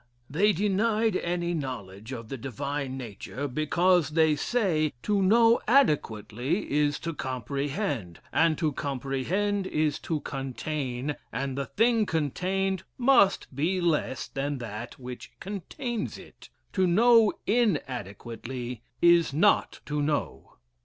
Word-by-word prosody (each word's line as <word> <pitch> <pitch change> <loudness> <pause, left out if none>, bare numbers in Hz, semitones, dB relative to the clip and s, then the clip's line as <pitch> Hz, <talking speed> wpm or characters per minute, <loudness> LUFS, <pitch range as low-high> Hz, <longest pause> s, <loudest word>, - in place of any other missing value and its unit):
They 200 +8 +4
denied 210 +3 +1
any 175 0 -1
knowledge 115 - -5
of 115 -4 -6
the - - -4
Divine 135 +2 -4
Nature, 125 +3 -5
because, 165 +4 +2
they 155 -1 +3
say, 160 -5 +1
to 205 -2 +1
know 230 +4 +5
adequately 145 - +1
is 145 0 +2
to 165 0 -3
comprehend, 135 - -3
and 160 -1 +3
to 155 -3 +1
comprehend 145 +10 -1
is 150 -3 0
to 160 -2 -2
contain, 135 0 -3
and 135 -1 -3
the 140 -1 -3
thing 225 - +2
contained 185 +5 -1 0.2
must 240 - +3
be 170 +7 +1
less 155 -7 0
than 140 +1 -3
that 120 0 -7
which 125 -1 -9
contains 210 - -4
it; - - -14 0.2
to 190 -2 +3
know 225 +4 +5
inadequately 125 - -2 0.2
is 170 -2 +6
not 205 +7 +3
to 150 0 -1
know. 145 0 -2
150 Hz, 120 wpm, -27 LUFS, 130-195 Hz, 0.2 s, is